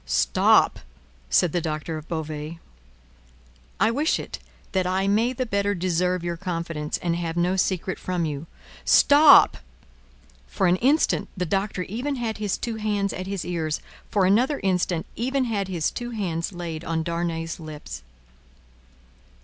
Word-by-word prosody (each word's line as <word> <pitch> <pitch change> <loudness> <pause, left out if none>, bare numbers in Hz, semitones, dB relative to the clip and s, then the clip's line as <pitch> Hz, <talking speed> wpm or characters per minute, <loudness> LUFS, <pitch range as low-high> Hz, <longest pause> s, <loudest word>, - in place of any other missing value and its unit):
"Stop!" 65 0 +3 0.5
said 155 - +3
the 175 - 0
Doctor 155 0 -3
of 155 0 -8
Beauvais. 155 0 -5 1.2
"I 225 - +4
wish 295 +7 +1
it, - - -7 0.3
that 185 -1 +1
I 190 +1 0
may 220 +5 +2
the 255 0 -2
better 200 -2 0
deserve 180 0 0
your 170 -1 -3
confidence, 165 -4 -3
and 170 -1 -1
have 170 -1 -3
no 180 +2 +2
secret 185 0 -1
from 180 -2 -1
you." 150 +1 -4 0.4
"Stop!" 290 0 +7 0.9
For - - -1
an 180 +1 +4
instant, 280 +9 +2
the 180 - -1
Doctor 195 +1 -1
even 245 +10 -3
had 230 -4 -3
his 210 -2 -1
two 230 -2 -4
hands 205 -2 -1
at 185 0 -5
his 195 -2 -3
ears; 160 -3 -2 0.3
for 200 -3 +2
another 245 +10 +3
instant, 180 -3 0
even 260 +3 0
had 210 -5 -1
his 175 -4 -1
two 240 0 -5
hands 180 -8 -2
laid 170 -3 -6
on 160 -1 -1
Darnay's 170 -1 -3
lips. 150 - -8
180 Hz, 150 wpm, -24 LUFS, 165-205 Hz, 1.2 s, Stop